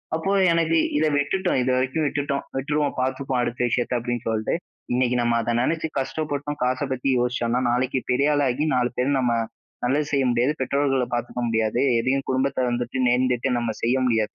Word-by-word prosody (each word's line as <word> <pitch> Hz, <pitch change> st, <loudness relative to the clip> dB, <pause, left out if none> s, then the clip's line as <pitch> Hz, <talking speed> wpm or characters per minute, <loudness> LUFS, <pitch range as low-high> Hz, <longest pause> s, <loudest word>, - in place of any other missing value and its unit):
அப்போ 165 Hz, +5 st, -1 dB, 0.2 s
எனக்கு 165 Hz, -1 st, +2 dB, 0.2 s
இத 155 Hz, -, +2 dB
விட்டுட்டோம் 180 Hz, +5 st, 0 dB
இது 130 Hz, -, +1 dB
வரைக்கும் 130 Hz, +5 st, 0 dB
விட்டுட்டோம், 140 Hz, -1 st, -2 dB
விட்டுருவோம், 145 Hz, +1 st, -1 dB
பார்த்துப்போம் 130 Hz, 0 st, -1 dB
அடுத்த 120 Hz, 0 st, -3 dB
விஷயத்த 120 Hz, +2 st, 0 dB
அப்பிடின்னு 120 Hz, 0 st, -3 dB
சொல்ட்டு, 110 Hz, -1 st, -1 dB, 0.4 s
இன்னக்கி 125 Hz, 0 st, +1 dB
நம்ம 120 Hz, 0 st, +1 dB
அத 115 Hz, -, -1 dB
நினச்சு 160 Hz, +3 st, 0 dB
கஷ்டப்பட்டோம். 145 Hz, +1 st, -3 dB
காச 130 Hz, +1 st, +1 dB
பத்தி 130 Hz, +1 st, -1 dB
யோசிச்சோனா, 120 Hz, 0 st, 0 dB
நாளைக்கி 130 Hz, +2 st, 0 dB
பெரியாளா 145 Hz, +2 st, +2 dB
ஆகி 145 Hz, +5 st, -1 dB
4 125 Hz, -1 st, +2 dB
பேர் 135 Hz, +2 st, +1 dB
நம்ம 125 Hz, -2 st, +1 dB, 0.5 s
நல்லது 145 Hz, +4 st, +1 dB
செய்ய 135 Hz, -1 st, +3 dB
முடியாது. 120 Hz, +5 st, +2 dB
பெற்றோர்கள 135 Hz, -1 st, +1 dB
பார்த்துக்க 120 Hz, +1 st, -3 dB
முடியாது. 110 Hz, +1 st, 0 dB, 0.2 s
எதையும் 135 Hz, +3 st, 0 dB
குடும்பத்தை 130 Hz, 0 st, 0 dB
வந்துட்டு 120 Hz, +1 st, -2 dB
நேர்ந்துட்டு 125 Hz, +1 st, +1 dB
நம்ம 120 Hz, -1 st, -1 dB
செய்ய 120 Hz, +2 st, +2 dB
முடியாது 110 Hz, -3 st, +1 dB
130 Hz, 165 wpm, -24 LUFS, 120-145 Hz, 0.5 s, செய்ய